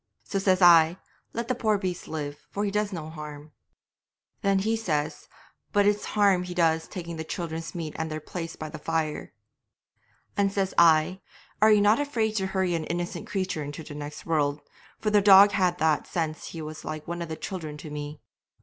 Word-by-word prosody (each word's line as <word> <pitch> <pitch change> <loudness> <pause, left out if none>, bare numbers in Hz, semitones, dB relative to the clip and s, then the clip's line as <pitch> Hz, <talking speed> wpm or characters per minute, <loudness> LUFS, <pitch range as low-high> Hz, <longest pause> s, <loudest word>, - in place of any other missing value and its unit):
'So 195 - -2
says 190 -1 +3
I, 170 0 +7 0.3
"Let 235 0 -4
the 255 - +1
poor 220 -4 +1
beast 185 -3 -4
live, 145 -2 -5
for 205 +1 -2
he 200 - -1
does 210 0 0
no 165 -5 -5
harm." 150 -1 -9 0.9
'Then 195 -1 +2 0.2
says 155 -8 -2
he, - - -23 0.4
"But 205 -1 +3
it's 205 0 +2
harm 200 -3 +5
he 180 0 -6
does 160 -2 +2
taking 170 -2 -6
the 160 - -3
children's 165 0 -5
meat 160 -3 -4
and 160 0 -2
their 155 0 -4
place 165 +1 -6
by 155 - -6
the - - -8
fire." 160 -1 -2 1.0
'And 200 -1 +2
says 195 -1 -1
I, 170 +2 +4 0.4
"Are 215 0 +7
ye 210 - +6
not 210 +4 +4
afraid 230 -7 0
to 190 -1 0
hurry 190 -2 0
an 165 -2 -1
innocent 175 +1 -4
creature 185 -6 -2
into 145 +2 -7
the 150 - -9
next 145 0 -7
world?" 145 -3 0 0.4
for 215 - -1
the 210 -1 +5
dog 200 0 +8
had 185 -3 +1
that 155 -2 +1
sense 160 -2 -3
he 165 -2 -7
was 155 0 -8
like 155 -1 -6
one 170 0 -4
of 170 - -5
the 160 - -3
children 155 -6 -6
to 150 0 -9
me. 150 0 -6
170 Hz, 200 wpm, -27 LUFS, 155-195 Hz, 1.0 s, dog